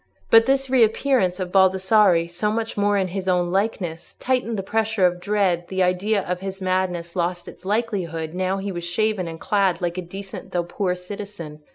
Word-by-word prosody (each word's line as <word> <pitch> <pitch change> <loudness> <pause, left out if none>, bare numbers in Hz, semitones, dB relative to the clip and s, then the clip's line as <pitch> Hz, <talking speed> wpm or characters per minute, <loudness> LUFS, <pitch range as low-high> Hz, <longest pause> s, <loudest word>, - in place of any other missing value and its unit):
But 225 +1 +7
this 270 0 +2
reappearance 230 -5 +2
of 180 -1 -3
Baldassarre 190 -2 +4
so 175 +5 -1
much 225 +1 -2
more 205 0 +2
in 190 -2 0
his 190 +1 -4
own 180 -1 +1
likeness 190 -4 -2
tightened 245 -3 0
the 195 - -3
pressure 220 -1 +1
of 180 0 +1
dread: 185 -3 0
the 190 0 0
idea 190 +3 +1
of 180 0 -3
his 195 0 -6
madness 185 -2 -1
lost 175 0 -2
its 180 - -12
likelihood 190 -7 -2
now 185 +1 -1
he 195 +1 -4
was 175 -2 -5
shaven 185 +2 0
and 165 0 -7
clad 195 -3 +1
like 175 0 -2
a - - -2
decent 195 +2 -9
though 175 -1 +1
poor 180 +1 -2
citizen. 180 -4 -8
190 Hz, 190 wpm, -23 LUFS, 175-210 Hz, -, But